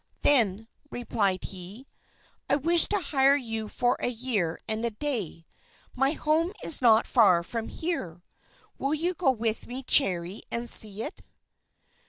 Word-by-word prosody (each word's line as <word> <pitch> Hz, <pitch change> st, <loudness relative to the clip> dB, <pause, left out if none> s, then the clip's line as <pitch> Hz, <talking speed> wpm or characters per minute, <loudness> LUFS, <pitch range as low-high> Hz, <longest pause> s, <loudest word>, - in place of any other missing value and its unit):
"Then," 225 Hz, -6 st, +2 dB, 0.2 s
replied 200 Hz, -7 st, -2 dB
he, 195 Hz, +7 st, -8 dB, 0.6 s
"I -, -, +3 dB
wish 330 Hz, +4 st, +4 dB
to 415 Hz, -, 0 dB
hire 280 Hz, -4 st, +2 dB
you 225 Hz, -5 st, -4 dB
for 245 Hz, +3 st, -1 dB
a -, -, -2 dB
year 225 Hz, -9 st, -2 dB
and 220 Hz, 0 st, -2 dB
a 235 Hz, -, +1 dB
day. 215 Hz, -, -4 dB, 0.5 s
My 270 Hz, +3 st, +1 dB
home 325 Hz, +4 st, 0 dB
is 320 Hz, -, +4 dB
not 225 Hz, -2 st, +4 dB
far 190 Hz, -8 st, +3 dB
from 225 Hz, +5 st, -5 dB
here. 185 Hz, -, -5 dB, 0.6 s
Will 280 Hz, +3 st, -1 dB
you 340 Hz, +4 st, -2 dB
go 350 Hz, -5 st, 0 dB
with 225 Hz, -3 st, -2 dB
me, 255 Hz, +2 st, -7 dB
Cherry, 185 Hz, -7 st, +2 dB
and 235 Hz, +1 st, -3 dB
see 215 Hz, -2 st, +4 dB
it?" -, -, -7 dB
235 Hz, 150 wpm, -26 LUFS, 205-280 Hz, 0.6 s, wish